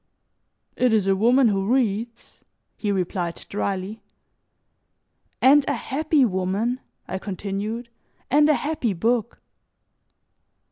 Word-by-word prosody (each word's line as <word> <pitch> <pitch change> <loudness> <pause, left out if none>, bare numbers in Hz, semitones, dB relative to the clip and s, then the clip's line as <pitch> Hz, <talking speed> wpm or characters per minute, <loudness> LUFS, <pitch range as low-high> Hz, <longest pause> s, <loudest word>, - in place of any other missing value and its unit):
"It 250 -2 +2
is 210 -3 +3
a 195 0 +3
woman 240 +5 +4
who 195 +1 0
reads," 235 -2 -2 0.3
he 210 - -2
replied 180 -2 -2
dryly. 200 +1 -3 1.4
"And 280 +2 +7
a - - +1
happy 300 0 +1
woman," 200 +5 -1 0.3
I 190 - -4
continued, 205 +4 -4 0.4
"and 295 +2 +5
a 300 - +5
happy 280 -4 -1
book." 230 +5 -1
220 Hz, 105 wpm, -23 LUFS, 195-250 Hz, 1.4 s, And